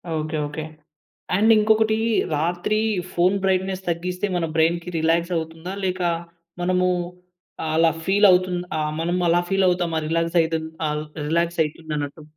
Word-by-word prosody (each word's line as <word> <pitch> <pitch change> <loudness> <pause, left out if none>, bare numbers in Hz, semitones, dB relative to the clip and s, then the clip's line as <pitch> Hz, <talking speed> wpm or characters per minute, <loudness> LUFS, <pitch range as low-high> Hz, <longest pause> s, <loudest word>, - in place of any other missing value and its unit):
Okay. 155 0 -2
Okay. 150 +2 -6 0.7
And 220 +3 +4
ఇంకొకటీ 220 +1 +3 0.4
రాత్రి 175 +7 0 0.3
phone 180 +3 +3
brightness 190 0 0
తగ్గిస్తే, 180 +3 -2
మన 170 -2 0
బ్రైన్‌కి 170 +2 +1
రిలాక్స్ 165 +2 +1
అవుతుందా? 165 +3 -5
లేక 185 0 -2 0.6
మనమూ 180 +1 +2 0.8
అలా 165 0 +4
ఫీల్ 200 +2 +4
అవుతుంది 180 -1 +1 0.2
ఆహ్, 150 0 -1
మనము 175 +2 0
అలా 175 +1 +4
ఫీల్ 195 0 +2
అవుతామా 175 -2 0
రిలాక్స్ 165 +1 0
అయితది 160 -1 -2 0.2
అల్ 150 0 -2 0.2
రిలాక్స్ 170 +1 0
అవుతుందన్నట్టు? 150 -1 -5
170 Hz, 130 wpm, -23 LUFS, 160-185 Hz, 0.8 s, And